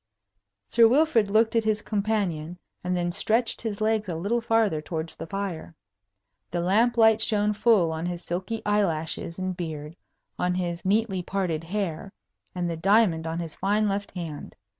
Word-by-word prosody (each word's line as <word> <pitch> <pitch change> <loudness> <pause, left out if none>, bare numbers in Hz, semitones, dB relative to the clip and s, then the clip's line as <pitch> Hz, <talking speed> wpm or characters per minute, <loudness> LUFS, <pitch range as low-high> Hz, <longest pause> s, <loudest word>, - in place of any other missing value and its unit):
Sir 230 - +6
Wilfrid 245 -5 +3
looked 225 +2 +3
at 230 - +3
his 215 -1 0
companion, 195 -6 -1 0.3
and 180 0 -1
then 175 0 -1
stretched 225 +6 0
his 215 -3 -4
legs 215 -2 +1
a 170 - -2
little 205 +9 0
farther 225 -8 +2
towards 160 +1 -5
the 165 - -7
fire. 185 -3 -5 0.7
The 175 - -2
lamp 220 +7 +2
light 220 -1 +5
shone 210 -1 +2
full 210 -6 +3
on 160 +2 -3
his 175 0 -4
silky 185 +6 -3
eyelashes 170 -5 -1
and 185 -1 -3
beard, 160 -3 -6 0.4
on 180 0 +1
his 175 -2 -3
neatly 200 -1 +1
parted 175 -4 -2
hair, 195 -1 -3 0.4
and 175 -1 -1
the 170 - -2
diamond 180 -3 +3
on 165 +1 -3
his 165 -2 -4
fine 210 +3 +1
left 200 0 -2
hand. 165 -5 -6
195 Hz, 165 wpm, -26 LUFS, 170-215 Hz, 0.7 s, Sir